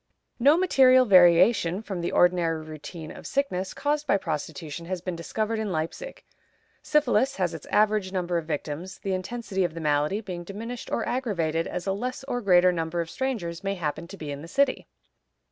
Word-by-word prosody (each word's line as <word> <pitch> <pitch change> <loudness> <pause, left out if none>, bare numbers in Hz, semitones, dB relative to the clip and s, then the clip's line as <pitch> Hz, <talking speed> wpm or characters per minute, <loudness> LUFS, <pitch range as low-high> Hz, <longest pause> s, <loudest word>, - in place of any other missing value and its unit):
No 285 +6 +6
material 260 -8 +5
variation 180 0 +5
from 190 -5 -4
the 170 - -2
ordinary 170 -3 +2
routine 155 +1 -8
of - - -9
sickness 190 -10 -1
caused 295 +1 -1
by - - +4
prostitution 160 -1 -5
has 185 0 -3
been 180 0 -4
discovered 215 +6 -2
in 215 -3 -2
Leipzig. 165 - -4 0.6
Syphilis 280 -2 +2
has 180 -3 -1
its 160 - -9
average 210 -2 +2
number 180 -2 -1
of 160 - -10
victims, 160 +4 -4
the 195 - -3
intensity 195 0 -2
of 175 -2 -2
the - - -5
malady 150 +5 +1
being 180 -5 -6
diminished 225 +6 -7
or 230 - -1
aggravated 170 -10 -1
as 180 - -5
a 195 - 0
less 250 +6 -4
or 245 -2 -3
greater 180 -3 +5
number 165 0 -2
of 165 -1 -3
strangers 210 -11 -3
may 195 0 -1
happen 165 -1 -4
to 195 +3 -10
be 150 -4 -6
in 140 0 -6
the 165 - -9
city. 275 +8 +1
185 Hz, 185 wpm, -26 LUFS, 165-225 Hz, 0.6 s, No